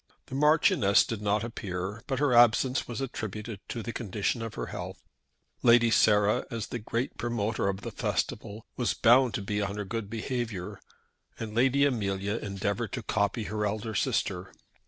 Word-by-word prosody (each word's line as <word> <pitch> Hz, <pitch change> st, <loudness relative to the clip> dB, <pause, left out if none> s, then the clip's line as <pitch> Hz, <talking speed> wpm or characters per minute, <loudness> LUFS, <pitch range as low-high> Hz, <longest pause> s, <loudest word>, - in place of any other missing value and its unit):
The -, -, -12 dB
Marchioness 150 Hz, -, +4 dB
did 115 Hz, -3 st, -4 dB
not 105 Hz, 0 st, +1 dB
appear, 100 Hz, -2 st, -5 dB
but 135 Hz, -, -1 dB
her 140 Hz, -1 st, +2 dB
absence 120 Hz, +2 st, +4 dB
was 120 Hz, +2 st, -4 dB
attributed 110 Hz, -4 st, -5 dB
to 115 Hz, -, -4 dB
the 115 Hz, -, -5 dB
condition 110 Hz, +1 st, -2 dB
of 115 Hz, -1 st, -5 dB
her -, -, -3 dB
health. -, -, -6 dB, 0.6 s
Lady 120 Hz, -1 st, +5 dB
Sarah, 105 Hz, -1 st, +4 dB
as 115 Hz, -3 st, -4 dB
the 120 Hz, -, -4 dB
great 115 Hz, +4 st, -3 dB
promoter 115 Hz, -3 st, -1 dB
of 95 Hz, 0 st, -3 dB
the -, -, -5 dB
festival, 105 Hz, +2 st, -3 dB
was 125 Hz, -, 0 dB
bound 120 Hz, -1 st, +5 dB
to 100 Hz, -, -3 dB
be 105 Hz, +1 st, -1 dB
on 100 Hz, 0 st, -3 dB
her 105 Hz, -, -3 dB
good 110 Hz, 0 st, -4 dB
behaviour, 115 Hz, -4 st, -4 dB, 0.6 s
and 110 Hz, -2 st, -5 dB
Lady 135 Hz, +4 st, +3 dB
Amelia 100 Hz, -5 st, -1 dB
endeavoured 100 Hz, +2 st, -3 dB
to 125 Hz, -, -3 dB
copy 100 Hz, +2 st, 0 dB
her 105 Hz, 0 st, -3 dB
elder 110 Hz, +2 st, -2 dB
sister. 95 Hz, -, -1 dB
110 Hz, 170 wpm, -28 LUFS, 100-120 Hz, 0.6 s, Lady